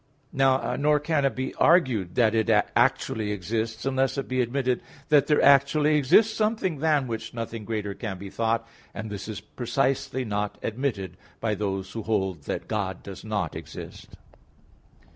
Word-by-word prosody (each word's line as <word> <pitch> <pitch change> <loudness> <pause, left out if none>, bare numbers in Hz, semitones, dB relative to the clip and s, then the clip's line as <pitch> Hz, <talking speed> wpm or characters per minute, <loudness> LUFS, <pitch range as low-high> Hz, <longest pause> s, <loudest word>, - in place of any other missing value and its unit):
Nor 135 +2 +2
can 150 -1 +1
it 135 - +1
be 130 +1 -3
argued 130 - +3
that 115 -3 +4
it 110 -1 +1 0.3
actually 105 -2 +1
exists, 110 +4 -3
unless 135 0 +1
it 135 - -3
be 130 0 +1
admitted 125 0 0 0.3
that 150 -2 +5
there 150 - +3
actually 140 +2 +5
exists 210 - +4
something 215 -8 0
than 150 -3 +2
which 115 -1 -5
nothing 115 -1 -5
greater 105 -2 -3
can 100 -1 -5
be 95 +1 -9
thought; 115 0 0 0.3
and 110 0 -5
this 105 +1 -5
precisely 130 +4 -1
is - - -7
not 105 0 -2
admitted 110 -7 -3 0.2
by 110 -2 0
those 95 -2 -3
who 115 - -4
hold 95 -8 -1
that - - -4
God 95 -5 -3
does 95 -2 -9
not 110 -2 -2
exist. - - -9
115 Hz, 160 wpm, -26 LUFS, 105-135 Hz, 0.3 s, that